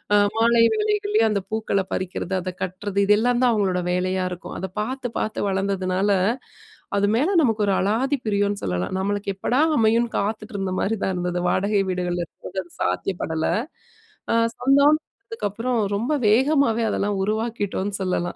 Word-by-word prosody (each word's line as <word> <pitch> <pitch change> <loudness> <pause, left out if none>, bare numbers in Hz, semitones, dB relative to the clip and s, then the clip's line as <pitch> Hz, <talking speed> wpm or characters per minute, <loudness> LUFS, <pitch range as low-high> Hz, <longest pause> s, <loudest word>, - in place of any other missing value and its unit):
அ - - +6 0.2
மாலை 230 0 +4
வேளைகள்லயே 420 - +1
அந்த 205 -2 0
பூக்கள 220 -2 0
பறிக்கறது, 185 0 -3
அத 185 +1 -4
கட்டுறது, 190 +2 -3
இதெல்லான் 240 +4 +3
தான் 250 - +5
அவுங்களோட 190 -4 +1
வேலையா 185 +1 0
இருக்கும். 180 +1 -7
அத 190 - -3
பாத்து, 255 +3 -3
பாத்து 215 - -2
வளந்ததுனால, 195 0 0 0.9
அது 200 0 +2
மேல 295 +9 +2
நமக்கு 225 -6 +1
ஒரு 200 - +3
அலாதி 240 +9 +1
பிரியன்னு 205 -1 0
சொல்லலாம். 90 - -2
நம்மளுக்கு 200 +1 -1
எப்படா 245 +8 +1 0.2
அமையும்னு, 230 +1 +3
காத்துட்டு 215 +2 -3
இருந்த 195 -1 -2
மாரி 220 +3 0
தான் 190 - 0
இருந்தது. 180 0 -2
வாடகை 200 +2 +1
வீடுகள்ல 180 -1 -1
இருக்கும் - - -22
போது 190 - -4
அது 175 - -22
சாத்தியப்படல, 160 - -1 0.9
அ - - +3 0.2
சொந்தம் 280 +4 +4 0.3
அதுக்கப்புறம் 240 - -2 0.2
ரொம்ப 240 +8 -1 0.2
வேகமாவே, 250 -1 +3
அதெல்லாம் 205 0 -1
உருவாக்கிட்டோன்னு 205 -2 -2
சொல்லலாம். 180 -1 -1
205 Hz, 150 wpm, -23 LUFS, 190-235 Hz, 0.9 s, அ